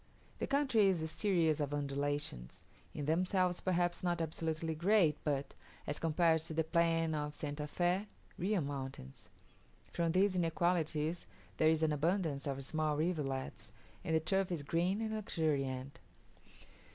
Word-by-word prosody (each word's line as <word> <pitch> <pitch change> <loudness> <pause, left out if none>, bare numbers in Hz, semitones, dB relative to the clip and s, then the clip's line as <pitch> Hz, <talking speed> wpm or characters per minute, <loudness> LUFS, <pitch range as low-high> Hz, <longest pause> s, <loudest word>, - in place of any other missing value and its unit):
The - - -1
country 265 -7 +3
is 180 -4 +1
a - - -1
series 165 -2 +1
of 145 -1 -1
undulations, 140 - -3 0.3
in 145 - -5
themselves 180 +3 +1
perhaps 175 -1 +1
not 175 -1 0
absolutely 160 0 -2
great, 170 -1 +3
but, 140 -2 -1 0.3
as 145 - -3
compared 165 0 +3
to 160 0 -6
the 160 - +2
plains 165 -1 +2
of 150 -1 -3
St. 150 0 -4
Fe, 180 +5 +1 0.3
real 195 +1 0
mountains. 135 - -6 0.6
From 170 -1 0
these 190 +1 +3
inequalities 165 -2 0 0.3
there 155 - +5
is 160 0 +2
an 155 -1 +2
abundance 155 -2 0
of 135 -1 -3
small 155 0 0
rivulets, 150 -5 -2 0.3
and 160 - 0
the - - +4
turf 185 +4 0
is 165 -5 -2
green 175 +8 0
and 220 -1 -2
luxuriant. 140 -9 -2
160 Hz, 145 wpm, -35 LUFS, 150-175 Hz, 0.6 s, there